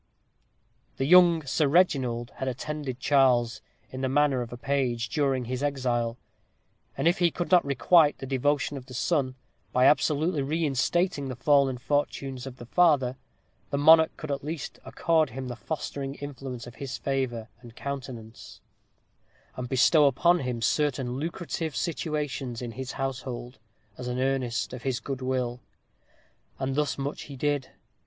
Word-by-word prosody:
The 135 - 0
young 170 -1 +6
Sir 140 +4 +1
Reginald 130 -7 +2
had 130 - -3
attended 135 0 -4
Charles, 125 -4 +3 0.3
in 130 - -6
the 130 - +1
character 140 -1 +2
of 120 0 -7
page, 125 -4 0
during 135 -5 0
his 130 +2 -3
exile; 125 -5 -1 0.8
and - - +1
if 175 +2 +3
he 175 -1 +4
could 175 +2 -4
not 180 -1 +6
requite 145 +4 +4
the - - -7
devotion 140 +2 0
of 130 -1 -10
the 130 - -9
son, 130 -2 0 0.4
by 125 +1 +3
absolutely 150 +2 +3
reinstating 150 +2 0
the 130 - -4
fallen 135 0 +3
fortunes 135 -1 -2
of 130 -1 -9
the 120 - -10
father, 140 -4 +3 0.5
the 140 - -1
monarch 160 +2 +6
could 155 -2 -5
at 140 -1 -3
least 155 0 -5
accord 155 +3 +1
him 130 +1 -6
the 120 - -4
fostering 140 +2 -5
influence 135 -4 -7
of 120 -2 -12
his 135 -1 -4
favor 130 -5 -2
and 120 -2 -13
countenance; 125 -5 -7 1.0
and 125 -1 -5
bestow 145 +4 +5
upon 170 +7 +3
him 125 -3 -3
certain 130 -2 0
lucrative 165 -1 -4
situations 150 -7 -3
in 120 -2 -5
his 130 +2 -6
household, 125 -2 -5 0.4
as 125 - -5
an 125 0 -2
earnest 130 -3 -1
of 125 - -6
his 130 -2 -1
good 135 -2 -5
will. 125 -1 -2 1.0
And 135 0 -2
thus 150 +1 0
much 140 +2 -4
he 140 - -9
did. 145 0 -1
135 Hz, 155 wpm, -27 LUFS, 125-150 Hz, 1.0 s, young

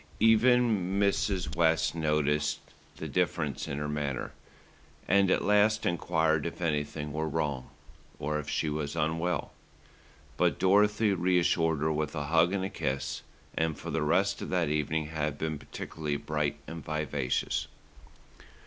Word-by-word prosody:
Even 115 -4 +4
Mrs. 100 -5 0
West 80 -2 +2
noticed 75 -2 +1 0.4
the - - -5
difference 80 -5 -1
in 70 - -3
her 75 0 -2
manner, 75 -3 -3 0.8
and 100 0 +4
at - - +2
last 105 +1 +3
enquired 80 -3 +1
if 85 - -7
anything 75 -2 -2
were 80 +1 -1
wrong, 70 -4 -2 0.5
or 75 +1 -2
if 75 - -6
she 80 - 0
were 75 -1 -2
unwell; 80 +3 -1 0.8
but - - +2
Dorothy 105 +2 +3
reassured 85 -3 +2
her 80 0 +1
with 75 +1 -2
a 75 - -2
hug 80 +4 +3
and 95 -1 -1
a - - -3
kiss, 65 0 -3 0.3
and 80 -2 0
for - - -6
the - - 0
rest - - +1
of - - -5
that 90 -4 +1
evening 75 +1 0
had 75 -2 -2
been 80 -1 -3
particularly 75 +1 -4
bright 75 0 -2
and 80 0 -7
vivacious. 75 -4 -1
80 Hz, 145 wpm, -29 LUFS, 75-90 Hz, 0.8 s, Even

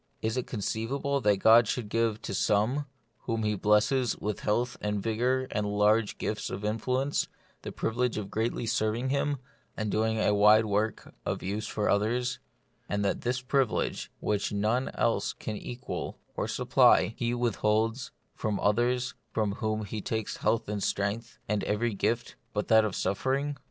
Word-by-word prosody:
Is 110 +1 0
it 125 - -2
conceivable 125 +6 -2
that 105 -3 +3
God 115 +3 +6
should 120 -1 -2
give 115 0 0
to - - -4
some, 110 +9 +1 0.4
whom 115 -2 -1
He 105 0 +1
blesses 105 +5 +2
with 105 -1 -3
health 120 +4 0
and 105 0 -1
vigour 125 +5 0
and 105 -1 -1
large 105 +1 +2
gifts 105 0 -3
of 100 +2 -5
influence, 125 +6 0 0.3
the - - -6
privilege 120 +1 -1
of 100 -2 -5
greatly 115 +2 -1
serving 110 +3 0
Him, 140 +1 0 0.4
of 110 -1 -1
doing 110 +1 +1
a 105 - +3
wide 105 +2 +6
work 105 +1 -1
of - - -3
use 105 +3 -3
for 105 - -1
others; 120 +5 +1 0.5
and 100 0 0
that 100 - 0
this 125 +1 -1
privilege, 130 -2 0
which 105 -1 -1
none 110 +5 +1
else 115 - +1
can 110 - -5
equal 120 +4 -5 0.2
or - - -1
sup - - -4
ply, 110 - +6
He 120 0 -1
withholds 115 +1 0 0.2
from 105 -3 -2
others 125 +4 +1 0.2
from 110 -2 0
whom 110 -1 -1
He 105 +1 -5
takes 110 +1 -3
health 110 +1 +1
and 105 -1 -3
strength, 100 +5 -2
and 105 -1 0
every 110 +2 0
gift 115 +4 -1 0.2
but 105 - -2
that 110 -1 +6
of 105 - -2
suffering 135 +9 0
110 Hz, 165 wpm, -29 LUFS, 105-120 Hz, 0.5 s, God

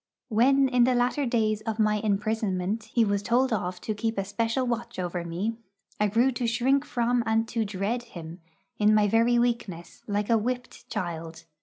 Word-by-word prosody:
When 265 +5 +4
in 250 -2 +3
the 255 0 +2
latter 250 +3 +1
days 215 -3 +1
of 220 0 -3
my 215 -1 +2
imprisonment 210 -1 -1
he 230 0 +2
was 200 -1 0
told 240 +4 +2
off 180 -3 -2
to 215 - -2
keep 225 +1 -2
a 195 - -1
special 230 +5 -1
watch 235 -1 -3
over 180 -1 -3
me, 185 +7 -3 0.4
I 210 - +3
grew 235 +6 +3
to 245 -1 -2
shrink 260 +5 +2
from 240 -2 +1
and 225 0 +2
to 230 -1 0
dread 205 +4 -2
him, 170 -7 -10 0.4
in 210 0 +5
my 210 -1 +4
very 230 +3 +3
weakness, 235 -8 -2
like 205 +1 -1
a 225 - +4
whipped 250 +3 -5
child. 165 -5 -5
220 Hz, 185 wpm, -27 LUFS, 200-240 Hz, 0.4 s, in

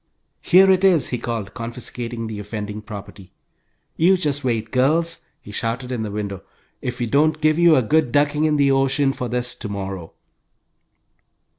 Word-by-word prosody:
"Here 190 +2 +6
it 185 0 +2
is!" 180 -6 +4
he 125 - -2
called, 115 -4 -4
confiscating 115 0 -5
the 110 -2 -6
offending 105 0 -6
property. 100 -3 -10 0.7
"You 185 +3 +4
just 145 -5 -1
wait, 115 -3 -1
girls!" 160 +6 +1
he 105 - -12
shouted 120 +4 -3
in 120 -3 -2
the 110 - -3
window. 100 -2 -4 0.4
"If 125 -1 -4
we 120 - -1
don't 150 +5 +2
give 155 +1 +2
you 170 -2 +6
a 130 - +3
good 150 +2 +2
ducking 145 +2 +2
in 155 -1 +2
the 140 -1 +3
ocean 135 +1 +2
for 125 -2 -4
this 125 +1 -1
to 105 - -7
morrow!" 95 -4 -6
125 Hz, 170 wpm, -21 LUFS, 110-150 Hz, 0.7 s, Here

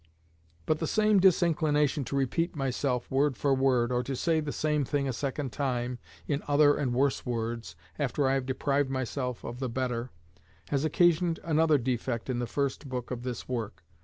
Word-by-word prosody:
But 155 - +1
the 160 - -1
same 215 +1 +3
disinclination 155 -6 +3
to 140 - -4
repeat 150 +6 0
myself 130 -2 -1
word 135 -1 +2
for 140 -1 +2
word, 130 -3 +2
or 125 0 +1
to 135 +2 -4
say 160 +4 +1
the 150 -2 -3
same 150 -1 0
thing 140 +1 -1
a 130 - -1
second 135 +1 -3
time 125 -1 -2 0.3
in 145 0 0
other 145 0 +5
and 140 -4 -1
worse 135 +3 +1
words, 115 -7 -3 0.2
after 140 0 +1
I 135 - +2
have 135 -1 -1
deprived 140 +1 0
myself 130 -1 -3
of 120 +1 -6
the 130 -2 -2
better, 125 0 -2 0.6
has 140 -1 0
occasioned 170 +1 +3
another 160 -1 +3
defect 125 -1 -2
in 120 - -2
the 120 - -2
first 140 +1 -2
book 125 -1 -4
of 125 -2 -3
this 125 -2 -5
work. 115 -7 -4
135 Hz, 185 wpm, -29 LUFS, 125-150 Hz, 0.6 s, other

